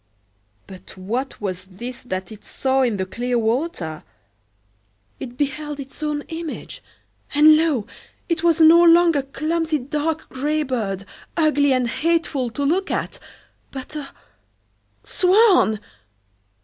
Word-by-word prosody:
But 190 -1 -13
what 235 +9 -4
was 185 -3 -4
this 235 +7 -8
that 185 -4 -5
it 215 - -12
saw 265 0 0
in 235 -5 +1
the 190 - -2
clear 245 +5 -2
water? 225 - -2 1.2
It 245 -1 -8
beheld 295 +1 -3
its 275 +2 -9
own 300 -1 -2
image; 325 -1 -6 0.5
and, 305 +1 +8
lo! 305 -9 +1 0.4
it 335 -2 -1
was 335 -2 +3
no 325 +1 +8
longer 335 -3 +5
clumsy 315 +3 -1
dark 300 +4 -3
gray 300 +4 -1
bird, 210 -8 -3 0.3
ugly 295 -3 +3
and 255 -2 +2
hateful 295 -1 0
to 265 +5 -4
look 360 +7 +1
at, - - -3 0.5
but 265 +3 -8
a—swan! 360 - 0
280 Hz, 125 wpm, -21 LUFS, 240-320 Hz, 1.2 s, and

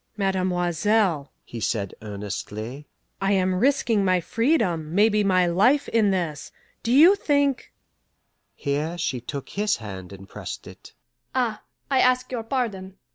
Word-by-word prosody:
"Mademoiselle," 185 -3 +1
he 120 - -8
said 105 -3 -2
earnestly, 105 +5 -6 0.3
"I 195 +1 +2
am 185 -1 +2
risking 230 0 +2
my 185 -1 +3
freedom, 180 - 0
maybe 210 +1 +4
my 185 -2 +3
life, 210 +12 +3
in 220 -3 +3
this; 170 -6 -2 0.3
do 230 - -2
you 315 +9 +8
think 285 -6 0 0.4
" - - -50
Here 150 +4 -2
she 130 -7 -2
took 140 +3 -6
his 210 +1 0
hand 95 -5 -8
and 95 0 -11
pressed - - -7
it. - - -13 0.4
"Ah, 235 -5 0 0.3
I 265 - +4
ask 255 0 +2
your 245 -3 -2
pardon. 220 -6 -3
190 Hz, 140 wpm, -24 LUFS, 150-225 Hz, 0.4 s, you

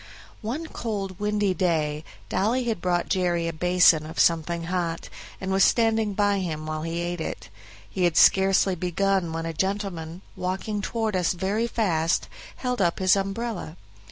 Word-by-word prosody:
One 255 +9 -3
cold 200 - -4
windy 210 -2 +1
day 155 -5 0 0.2
Dolly 225 +7 +1
had 225 -7 -2
brought 175 -1 0
Jerry 175 -2 0
a 165 - -3
basin 180 -2 +4
of 160 - -7
something 170 0 +2
hot, 170 -1 -3 0.3
and 190 0 -3
was 195 0 +4
standing 225 -3 +2
by 205 -1 +2
him 155 -4 -4
while 155 0 -3
he 165 +1 -3
ate 175 -1 -3
it. - - -5 0.4
He 185 -2 -1
had 170 -2 +1
scarcely 195 0 +5
begun 180 0 0
when 165 0 -3
a 165 - -3
gentleman, 185 -2 -3
walking 195 +3 -3
toward 220 0 -2
us 180 -1 +1
very 195 +6 -1
fast, 170 -8 0 0.3
held 250 -3 -2
up 170 -2 +2
his 185 0 +4
umbrella. 195 -3 -3
185 Hz, 160 wpm, -25 LUFS, 170-205 Hz, 0.4 s, scarcely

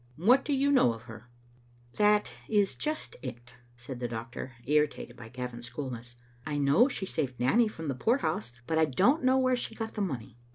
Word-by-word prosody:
" 125 - -30
What 265 +2 +7
do 295 - -3
you 280 +1 +3
know 125 - +5
of 115 - -13
her?" 120 +1 -12 0.3
" - - -32 0.3
That 210 0 +3 0.2
is 205 -3 +3
just 310 0 -3
it," 125 -2 -8 0.2
said 125 +1 -7
the 120 - -2
doctor, 120 +3 -6
irritated 150 -4 +1
by 115 -2 -11
Gavin's 125 -1 -6
coolness. 120 -2 -6 0.3
"I 150 +1 -3
know 145 - +5
she 235 -8 -4
saved 130 -9 -3
Nanny 225 - +4
from 165 -7 -6
the 140 - 0
poor 225 - +2
house, 125 - -2
but 160 +3 +1
I 160 - +5
don't 200 - +3
know 260 +1 +4
where 255 -1 +3
she 240 -2 -4
got 225 -1 -4
the 210 - -3
money. 120 - -4
145 Hz, 210 wpm, -30 LUFS, -, 0.3 s, What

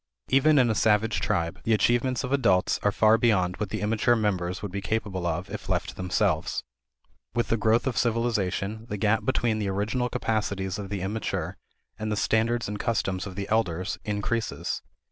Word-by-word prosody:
Even 145 +3 +5
in 125 -3 +5
a 110 - +2
savage 110 +1 +2
tribe, 85 +2 -1
the 115 - +3
achievements 120 +3 +1
of 130 +1 -2
adults 115 -9 +3
are 105 - +2
far 110 +2 +4
beyond 95 -6 +2
what 105 -2 -3
the - - -3
immature 110 +3 +2
members 95 -4 -1
would 100 - -4
be 100 +1 -3
capable 100 -4 -2
of 85 +3 -2
if - - -7
left - - 0
to - - -9
themselves. 90 -1 0 0.7
With 120 - 0
the - - +3
growth 110 +2 +2
of 130 -3 -1
civilization, 110 -2 0
the 105 - -3
gap 105 +2 +1
between 120 -4 +1
the 100 -2 -1
original 105 +6 -1
capacities 105 -5 -1
of 100 -2 -6
the 100 -2 -3
immature 105 +3 -3 0.4
and 110 0 -2
the 105 - 0
standards 115 +2 +1
and 105 0 -4
customs 100 -5 -1
of 95 - -8
the 100 0 -4
elders 95 -4 0
increases. 105 +2 -2
105 Hz, 185 wpm, -27 LUFS, 95-115 Hz, 0.7 s, Even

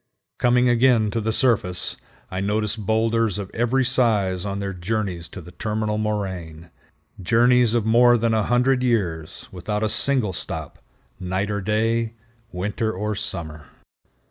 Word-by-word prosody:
Coming 125 +1 +3
again 120 -3 +3
to 115 - -1
the 110 +1 -1
surface, 110 -7 +1 0.4
I 95 +1 -3
noticed 105 +1 -1
boulders 110 -1 +1
of 100 -2 -6
every 125 +3 +1
size 105 -7 +1
on 100 0 -3
their 100 -1 -3
journeys 90 -2 -3
to - - -9
the 90 - -12
terminal 105 +2 -2
moraine—journeys 105 +5 -1
of 115 -3 +1
more 120 +2 +5
than 115 0 +1
a 110 - +2
hundred 125 +4 +2
years, 90 -11 -1
without 105 +4 -3
a 110 - +1
single 125 -6 +1
stop, - - -6 0.4
night 95 +3 -2
or 100 0 -2
day, 110 +3 0 0.4
winter 105 +4 -2
or 105 +2 -3
summer. 80 -6 -5
105 Hz, 145 wpm, -23 LUFS, 95-115 Hz, 0.4 s, more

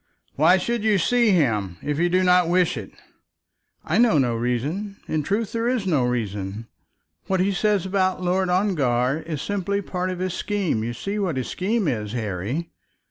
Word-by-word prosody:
"Why 160 +6 +5
should 235 +4 -2
you 215 -2 +3
see 235 +5 +3
him, 110 - +1
if 145 0 -2
you 175 +1 +2
do 185 +1 +2
not 180 -1 +4
wish 180 -2 +2
it?" 110 -6 -6 1.0
"I 175 +7 +1
know 235 -8 +5
no 125 -4 +2
reason. 140 - -2
In 155 - 0
truth 205 +8 -1
there 230 0 -1
is 250 -5 -1
no 155 -9 +2
reason. 105 -3 -3 0.6
What 190 -1 +1
he 190 +2 +2
says 200 -1 +1
about 190 -1 +1
Lord 185 +1 0
Ongar 145 -8 +1
is 155 -3 -5
simply 200 -1 -1
some 200 - -9
part 185 0 -2
of 185 - -3
his 185 0 -2
scheme. 190 - -1
You 120 +1 -3
see 200 - -4
what 180 -8 -1
his 130 - -3
scheme 205 +1 -1
is, 110 -6 -2
Harry?" 115 - -3
180 Hz, 190 wpm, -23 LUFS, 125-195 Hz, 1.0 s, Why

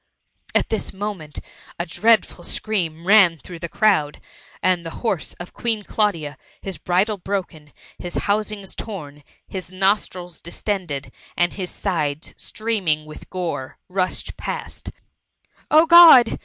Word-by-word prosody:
At - - +2
this 220 - -2
moment 190 -6 -5 0.4
a 170 - -2
dreadful 220 +5 +2
scream 170 -7 -2
ran 190 -4 +6
through 170 +3 -10
the 170 - -5
crowd, 175 -9 +2 0.4
and 180 -2 +2
the 165 - -5 0.2
horse 195 -7 -1
of 175 - -9
Queen 225 -3 -1
Claudia, 170 -10 -1 0.2
his 195 -2 -5
bridle 195 +4 +1
broken, 175 -6 -4 0.3
his 175 - -6
housings 205 -1 -1
torn, 150 -9 -7 0.3
his 185 -2 -6
nostrils 185 -3 -1
distended, 170 -5 -3 0.3
and 175 0 +2
his 185 -3 -4
sides 155 -3 -2
streaming 195 -9 -1
with 155 0 -12
gore, 165 -8 -4
rushed 185 0 -1
past - - -6 0.3
— - - -56
" - - -44
Oh 315 +2 +6
God 330 -8 +9
185 Hz, 135 wpm, -22 LUFS, 165-210 Hz, 0.4 s, God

